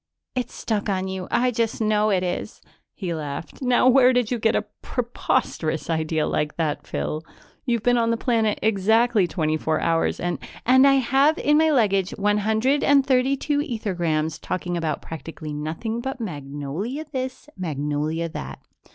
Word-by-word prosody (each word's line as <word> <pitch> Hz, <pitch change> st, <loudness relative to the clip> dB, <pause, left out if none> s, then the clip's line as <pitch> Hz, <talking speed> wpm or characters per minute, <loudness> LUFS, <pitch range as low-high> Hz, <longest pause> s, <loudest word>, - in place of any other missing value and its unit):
It's 250 Hz, -1 st, -3 dB
stuck 210 Hz, -2 st, -2 dB
on 190 Hz, -1 st, -1 dB
you; 190 Hz, -1 st, -5 dB
I 250 Hz, +1 st, +2 dB
just 225 Hz, -1 st, -1 dB
know 215 Hz, -1 st, +2 dB
it 185 Hz, -3 st, +2 dB
is." 180 Hz, +3 st, -4 dB, 0.4 s
He 180 Hz, -4 st, -3 dB
laughed. 150 Hz, -, -6 dB
"Now 250 Hz, -1 st, +3 dB
where 255 Hz, 0 st, +6 dB
did 245 Hz, -2 st, +1 dB
you 245 Hz, -, 0 dB
get 225 Hz, 0 st, +2 dB
a 210 Hz, -, 0 dB, 0.2 s
preposterous 170 Hz, -, -1 dB
idea 160 Hz, -1 st, 0 dB
like 150 Hz, 0 st, -1 dB
that, 155 Hz, -3 st, -2 dB
Phyl? 155 Hz, -, -3 dB, 0.5 s
You've 235 Hz, -3 st, +1 dB
been 245 Hz, 0 st, +3 dB
on 230 Hz, 0 st, +2 dB
the 230 Hz, -, +1 dB
planet 225 Hz, -4 st, +1 dB
exactly 220 Hz, 0 st, +3 dB
twenty 155 Hz, -3 st, 0 dB
four 155 Hz, 0 st, 0 dB
hours 165 Hz, 0 st, +1 dB
and 175 Hz, 0 st, -2 dB
" -, -, -15 dB
" -, -, -32 dB
and 260 Hz, +3 st, +6 dB
I 275 Hz, -, +6 dB
have, 275 Hz, +4 st, +3 dB
in 295 Hz, +1 st, +3 dB
my 320 Hz, 0 st, +4 dB
luggage, 200 Hz, -9 st, +2 dB
one 205 Hz, +1 st, +2 dB
hundred 220 Hz, +7 st, +1 dB
and 280 Hz, -1 st, +5 dB
thirty 265 Hz, +1 st, +2 dB
two 290 Hz, +1 st, 0 dB
ethergrams 175 Hz, -, -1 dB
talking 180 Hz, -1 st, -3 dB
about 160 Hz, -3 st, -2 dB
practically 155 Hz, 0 st, -7 dB
nothing 160 Hz, +11 st, -3 dB
but 265 Hz, +1 st, -4 dB
Magnolia 155 Hz, -, -5 dB
this, 260 Hz, 0 st, -4 dB
Magnolia 155 Hz, -1 st, -2 dB
that. 70 Hz, -, -6 dB
210 Hz, 175 wpm, -23 LUFS, 160-250 Hz, 0.5 s, where